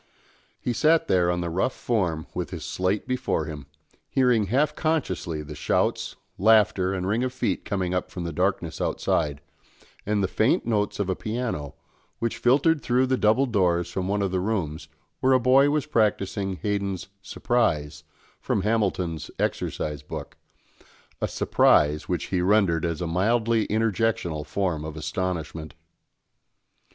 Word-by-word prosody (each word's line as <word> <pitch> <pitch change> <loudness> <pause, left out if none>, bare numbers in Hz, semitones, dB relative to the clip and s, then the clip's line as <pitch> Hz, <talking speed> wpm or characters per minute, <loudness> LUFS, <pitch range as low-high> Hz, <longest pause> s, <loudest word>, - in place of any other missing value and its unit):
He 125 - -2
sat 160 +5 +3
there 90 -2 +3
on 90 0 0
the 85 - -2
rough 95 +9 0
form 90 -9 -1
with - - -3
his - - -6
slate 95 +5 -1
before 125 -11 -1
him, 75 -3 -8 0.4
hearing 125 -6 +3
half 140 +8 +2
unconsciously 110 - -2
the 75 +1 -8
shouts, 75 - 0 0.2
laughter, 100 -3 +4
and 95 -2 -2
ring 110 +5 +1
of 130 - -1
feet 130 - -2
coming 95 -3 -1
up 90 - -1
from 90 - -6
the 85 -1 -4
darkness - - -1
outside, 75 -3 0 0.6
and 105 -1 0
the - - +2
faint 110 +4 +1
notes 105 -3 0
of 100 - 0
a 95 - 0
piano, 110 - -4 0.4
which 115 -1 -2
filtered 145 +5 +3
through 125 +1 +2
the 130 0 +1
double 120 +3 +3
doors 90 -7 +1
from 95 -1 -2
one 100 +1 0
of 95 - -1
the 95 - 0
rooms, 90 -6 -2 0.3
where 130 0 +3
a 130 - +5
boy 130 +3 +5
was 150 -1 0
practising 100 -6 0
Haydn's 100 -3 -2
"Surprise," 75 -10 -1 0.4
from 95 - -1
Hamilton's 95 -7 -1
exercise 75 -2 -2
book, 75 - -8 0.9
a - - +1
surprise 75 +1 +3
which 90 - -2
he 90 - +2
rendered 90 -4 +3
as 85 0 -2
a - - -1
mildly 110 +6 +1
interjectional 110 -8 0
form 85 -3 -1
of 80 0 -6
astonishment. 80 -2 -4
95 Hz, 155 wpm, -25 LUFS, 85-115 Hz, 0.9 s, a